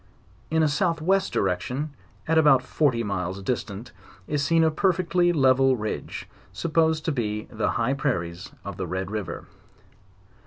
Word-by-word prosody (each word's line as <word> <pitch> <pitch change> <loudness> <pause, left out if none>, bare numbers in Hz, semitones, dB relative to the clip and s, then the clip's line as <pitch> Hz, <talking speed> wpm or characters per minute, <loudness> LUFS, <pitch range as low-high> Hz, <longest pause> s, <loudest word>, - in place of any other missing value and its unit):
In 160 0 +2
a - - +4
south 165 +3 +1
west 190 +5 +1
direction, 125 +11 -1 0.4
at 160 - +2
about 140 -5 +5
forty 130 -4 +1
miles 95 -2 -3
distance, 110 0 -3 0.3
is 145 +3 -1
seen 165 +3 +3
a 160 - +3
perfectly 180 0 +2
level 135 -3 +4
ridge, 110 -1 -5 0.2
supposed 160 - +1
to 160 - +1
be 105 -5 -2
the 110 - -1
high 120 +3 +1
prairies 90 -7 -2
of - - -6
the - - -3
Red 95 +1 -3
river. 105 -4 -4
135 Hz, 150 wpm, -25 LUFS, 105-160 Hz, 0.4 s, about